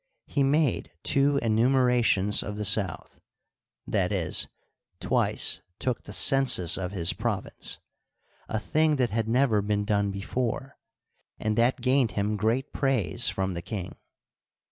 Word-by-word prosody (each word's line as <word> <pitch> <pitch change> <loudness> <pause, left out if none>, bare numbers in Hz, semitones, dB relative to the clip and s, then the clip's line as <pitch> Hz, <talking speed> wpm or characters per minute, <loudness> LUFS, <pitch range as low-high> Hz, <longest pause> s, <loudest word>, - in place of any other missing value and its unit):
He 140 - -2
made 140 - +1
two 140 0 +3
enumerations 115 -3 +2
of 105 +1 -6
the 105 - -3
South 95 -4 -1 0.7
(i. - - +2
e., - - -2 0.7
twice - - +1 0.2
took 125 -2 -1
the - - -9
census 130 - +4
of 95 -1 -4
his 85 -4 +1
province), - - -3 0.7
a 110 - -1
thing 155 +7 +1
that 125 -5 0
had 110 +1 -1
never 115 -3 +2
been 105 0 -1
done 100 -1 0
before, 120 +7 -4 0.6
and 110 0 -2
that 120 +2 +1
gained 130 -1 +1
him 105 +1 -1
great 110 +6 -1
praise 120 -4 +1
from 95 -1 -2
the 85 - -5
king. 95 0 -6
110 Hz, 135 wpm, -26 LUFS, 100-130 Hz, 0.7 s, census